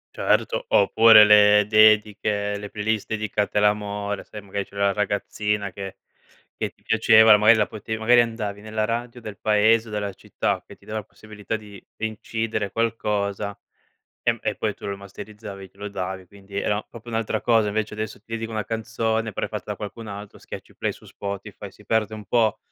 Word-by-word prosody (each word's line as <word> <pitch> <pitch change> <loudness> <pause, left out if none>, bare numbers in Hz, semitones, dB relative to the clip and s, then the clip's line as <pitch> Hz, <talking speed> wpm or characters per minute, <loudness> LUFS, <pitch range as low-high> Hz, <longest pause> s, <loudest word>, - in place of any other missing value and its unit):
Certo. - - +1
Oppure 115 - +7
le 105 0 +6
dediche, 105 -1 +3
le 105 0 -7
playlist 105 0 -2
dedicate 105 -1 -2
all'amore, 105 -1 0
sai 105 -2 -10
magari 100 0 -3
c'era 100 0 -2
la 100 - +2
ragazzina 105 0 -1
che 95 0 -8 0.6
che - - -2
ti - - -34
piaceva 110 0 +6
la 105 - +9
magari 110 +2 +6
la 105 - +2
potevi 110 +1 -5
magari 120 +2 +5
andavi 110 -3 -3
nella 110 0 -2
radio 120 +2 -4
del 105 -3 -8
paese, 110 +1 +3
della 105 -1 -2
città - - -2
che - - -13
ti - - -23
dava 110 0 -4
la - - -8
possibilità 110 +2 -7
di 105 -2 -13
incidere 110 -1 -3
qualcosa, 105 -3 -1 0.7
ehm, - - +1
e - - -1
poi - - -2
tu - - -15
lo 100 0 -3
masterizzavi, 100 0 -10
glielo 100 +1 -7
davi, 95 -1 -5
quindi 100 +1 -9
era 105 +1 0
proprio 120 0 -11
un'altra 110 -1 -1
cosa. 115 -3 +3
Invece 105 +1 -2
adesso 110 0 -5
ti 110 +2 -16
dedico 115 0 -3
una 110 -2 -3
canzone, 115 0 -2
però - - -2
è - - -12
fatta 105 -1 -6
da 105 - -3
qualcun 110 +2 -7
altro, 100 0 -9
schiacci - - -10
play - - -1
su - - -17
Spotify, 100 0 -7
si 105 - -20
perde 110 -1 +1
un 110 -1 -7
po' 115 -3 +2
105 Hz, 185 wpm, -24 LUFS, 100-110 Hz, 0.7 s, la